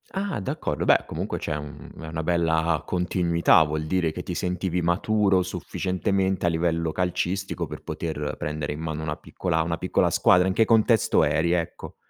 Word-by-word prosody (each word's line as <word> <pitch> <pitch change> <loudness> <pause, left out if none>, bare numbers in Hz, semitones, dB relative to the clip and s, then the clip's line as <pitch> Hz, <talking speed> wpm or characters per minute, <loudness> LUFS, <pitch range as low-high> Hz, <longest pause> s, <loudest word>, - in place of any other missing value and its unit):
Ah! 195 - -2
D'accordo, 95 - -3
beh - - +4
comunque - - -4
c'è 75 - -3
un 75 -1 -8
è 80 - -7
una 80 0 -4
bella 80 -2 +1
continuità, 85 -2 +3
vuol 75 0 -2
dire 85 0 0
che - - -6
ti - - -5
sentivi 90 0 -2
maturo 95 +3 +2
sufficientemente, 95 +2 -1
a - - +4
livello 85 -1 0
calcistico, 90 +2 -2
per - - -8
poter 75 -3 -4
prendere 75 -1 -3
in 75 - -8
mano 80 -1 -4
una 75 -1 -2
piccola 80 0 -2
una 85 +1 -2
piccola 90 - +1
squadra 90 +1 +4
in 95 - +1
che 110 +3 +3
contesto 110 0 +3
eri? 85 +1 +1
Ecco. 85 -1 -3
85 Hz, 175 wpm, -25 LUFS, 80-95 Hz, -, beh